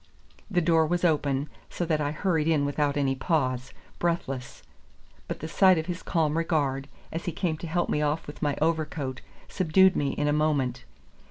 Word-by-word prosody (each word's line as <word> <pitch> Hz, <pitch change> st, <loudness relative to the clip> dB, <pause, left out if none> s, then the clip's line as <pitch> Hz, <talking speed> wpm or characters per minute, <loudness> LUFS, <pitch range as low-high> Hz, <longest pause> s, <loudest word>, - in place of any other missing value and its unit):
The 180 Hz, -4 st, +2 dB
door 160 Hz, -1 st, +3 dB
was 175 Hz, +2 st, 0 dB
open, 145 Hz, -3 st, +1 dB, 0.2 s
so 175 Hz, -, -3 dB
that 155 Hz, -2 st, 0 dB
I 145 Hz, -, 0 dB
hurried 160 Hz, 0 st, 0 dB
in 155 Hz, -3 st, +2 dB
without 145 Hz, 0 st, 0 dB
any 135 Hz, -2 st, +2 dB
pause, 130 Hz, -4 st, -1 dB, 0.3 s
breathless; 135 Hz, -7 st, -2 dB, 0.6 s
but -, -, -5 dB
the 160 Hz, -, -4 dB
sight 185 Hz, +2 st, +5 dB
of 160 Hz, -, -1 dB
his 175 Hz, 0 st, -4 dB
calm 160 Hz, -2 st, 0 dB
regard, 140 Hz, -5 st, 0 dB, 0.2 s
as 165 Hz, +1 st, -4 dB
he 175 Hz, -, -1 dB
came 170 Hz, -2 st, -1 dB
to 170 Hz, -, -6 dB
help 175 Hz, +2 st, 0 dB
me 150 Hz, -, 0 dB
off 150 Hz, +2 st, 0 dB
with 145 Hz, -, -10 dB
my 145 Hz, -1 st, 0 dB
overcoat, 155 Hz, -5 st, -1 dB, 0.3 s
subdued 185 Hz, +1 st, +4 dB
me 140 Hz, -1 st, 0 dB
in 145 Hz, -, -1 dB
a 145 Hz, -, +2 dB
moment. 135 Hz, -5 st, 0 dB
155 Hz, 185 wpm, -27 LUFS, 145-170 Hz, 0.6 s, sight